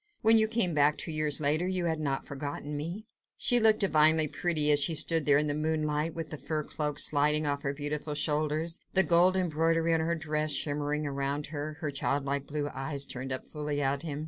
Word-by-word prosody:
When 225 0 +6
you 220 - +4
came 220 -6 0
back 150 0 +2
two 165 - -3
years 155 -1 +1
later 155 +4 +1
you 185 -2 -1
had 160 -2 -1
not 140 -3 -3
forgotten 145 +1 -6
me." 170 +9 -6 0.3
She 245 - +4
looked 220 -1 +3
divinely 155 -4 +4
pretty 155 -1 +2
as 145 - +4
she 160 +3 0
stood 160 0 +3
there 140 -1 +5
in 150 - +1
the 145 - -1
moonlight, 155 +1 -2
with 165 -1 -6
the 155 - -7
fur 155 -1 -3
cloak 150 -1 -4
sliding 150 +1 +3
off 140 -1 -1
her 140 - -2
beautiful 150 +1 -4
shoulders, 155 +2 -1 0.2
the 190 - +7
gold 180 +2 +3
embroidery 165 -1 0
on 165 - +2
her 165 +1 -1
dress 155 -1 -2
shimmering 150 0 -2
around 140 +1 -3
her, 150 +1 -4
her 150 -3 -3
childlike 140 0 -2
blue 145 -1 -3
eyes 135 +1 -1
turned 130 0 -6
up 130 - -4
fully 150 -1 -4
at 140 0 -1
him. 150 -3 -5
150 Hz, 210 wpm, -29 LUFS, 145-165 Hz, 0.3 s, the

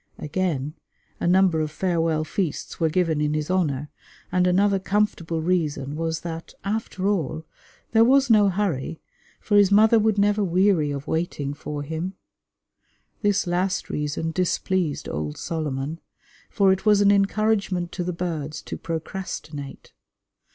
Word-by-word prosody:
Again, 150 -3 -2 0.5
a - - -1
number 180 -3 +4
of 155 - -1
farewell 165 -1 0
feasts 170 0 -3
were 165 -1 +2
given 165 -3 +1
in 150 0 0
his 155 +3 -2
honour; 150 -6 0 0.4
and 180 0 +3
another 195 +2 +3
comfortable 185 -5 0
reason 150 -5 -1
was 165 0 -2
that, 165 -1 -7
after 200 -2 -2
all, 160 -5 -1 0.5
there 225 0 +6
was 270 +3 +5
no 210 -4 +5
hurry, 175 -6 -2 0.4
for 205 - +2
his 200 -1 +5
mother 220 +2 +6
would 215 -1 +2
never 205 +1 +3
weary 180 -4 +3
of 140 0 -4
waiting 160 -4 -2
for 145 0 -5
him. 160 +5 -4 1.1
This 205 -2 +2
last 180 +2 -1
reason 150 +2 -2
displeased 180 -2 -1
old 75 0 -4
Solomon, 155 -1 -3 0.5
for 195 -3 +3
it 190 - -4
was 210 -1 +5
an 200 0 +6
encouragement 200 -3 +1
to 180 - -3
the 180 - -2
birds 165 -4 -4
to - - -6
procrastinate. 160 -4 -6
175 Hz, 145 wpm, -24 LUFS, 155-195 Hz, 1.1 s, there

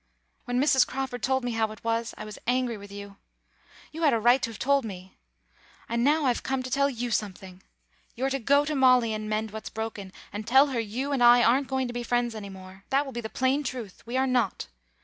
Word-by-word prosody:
When 245 0 -1
Mrs. 265 -2 +4
Crawford 260 -2 -4
told 265 0 +1
me 245 - -2
how 225 -1 0
it 215 - -12
was 230 0 -1
I 215 - -7
was 210 -1 -9
angry 250 -1 +1
with 200 -1 -11
you. 200 0 -9 0.7
You 320 - -7
had 305 -3 +4
a 230 - +2
right 240 +4 +4
to - - -1
have 225 - -9
told 280 +1 +2
me. 190 -3 -9 0.7
And 235 0 0
now 295 +2 +3
I've 245 -2 +1
come 265 -1 -2
to 255 - -7
tell 280 +1 +2
you 245 -2 -4
something. 190 -3 -4 0.5
You're 265 +3 -1
to 270 - -1
go 280 +4 +3
to 305 - -2
Molly 255 -4 +4
and 215 0 -4
mend 215 0 -2
what's 220 +1 -7
broken, 215 -3 -6 0.2
and 210 +1 -6
tell 265 +4 +6
her 255 -3 -2
you 235 +6 -3
and 275 -3 0
I 240 0 +7
aren't 260 +4 +3
going 265 -1 -1
to 240 - -6
be 245 - -3
friends 240 0 0
any 210 -2 -7
more. 190 0 -12
That 275 +2 +2
will 270 - -8
be 240 - -4
the 220 - -6
plain 260 +4 +1
truth. 240 -8 -6
We 245 +2 -2
are 265 - +2
not. 245 - 0
240 Hz, 240 wpm, -27 LUFS, 215-265 Hz, 0.7 s, I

